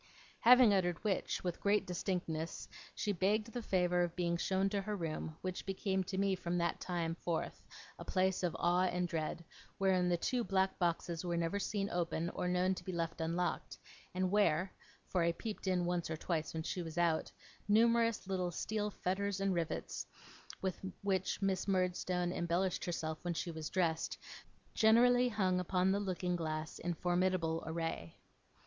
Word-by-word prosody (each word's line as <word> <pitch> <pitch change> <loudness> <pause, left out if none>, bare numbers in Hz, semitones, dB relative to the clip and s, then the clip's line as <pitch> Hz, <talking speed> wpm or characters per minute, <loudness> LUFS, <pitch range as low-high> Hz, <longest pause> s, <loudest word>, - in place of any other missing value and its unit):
Having 245 -3 +8
uttered 175 -3 +2
which, 205 -4 -1
with 175 -2 -3
great 205 +1 +3
distinctness, 175 -3 -3 0.3
she 210 - 0
begged 210 +4 +1
the 245 - -3
favour 180 -4 +2
of 175 -1 -1
being 170 -1 0
shown 190 +3 +1
to 200 0 -1
her 210 +2 -3
room, 160 -3 -4
which 185 -1 -3
became 190 0 -1
to 190 - -4
me 195 0 +2
from 175 -1 -2
that 170 0 0
time 170 -2 -2
forth 170 -1 -3 0.4
a - - -6
place 190 0 +1
of 180 -2 0
awe 175 +1 +3
and 180 0 0
dread, 165 0 -3 0.3
wherein 185 -2 +3
the 175 - +2
two 245 +7 0
black 190 -2 +1
boxes 170 -1 0
were 175 -1 -1
never 170 +4 0
seen 200 0 -1
open 170 -1 -1
or - - -2
known 180 +1 +2
to - - -7
be 190 - -4
left 165 -1 -2
unlocked, 170 +2 -1 0.4
and 185 0 +1
where 190 -3 +2 0.3
(for 180 - 0
I 170 0 +3
peeped 210 +2 -6
in 180 -2 +2
once 175 -1 -1
or 160 - -2
twice 160 -1 -2
when 160 0 -3
she 180 - -3
was 165 -1 -7
out) 170 -2 +2 0.4
numerous 230 +1 +4
little 185 -2 -1
steel 210 +4 -2
fetters 200 0 -2
and 195 -1 +1
rivets, 170 -2 -3 0.6
with 190 -2 -1 0.2
which 190 0 0
Miss 190 -1 0
Murdstone 180 -1 0
embellished 175 +2 0
herself 160 -2 -3
when 175 -1 -2
she 170 - -2
was 160 -1 -5
dressed, 165 -3 0 0.6
generally 245 +3 +5
hung 190 -5 +1
upon 180 +1 +2
the 200 - +2
looking 180 -2 -1
glass 155 -1 -3
in 175 0 -2
formidable 175 -2 +1
array. 165 - -3
180 Hz, 175 wpm, -35 LUFS, 170-195 Hz, 0.6 s, Having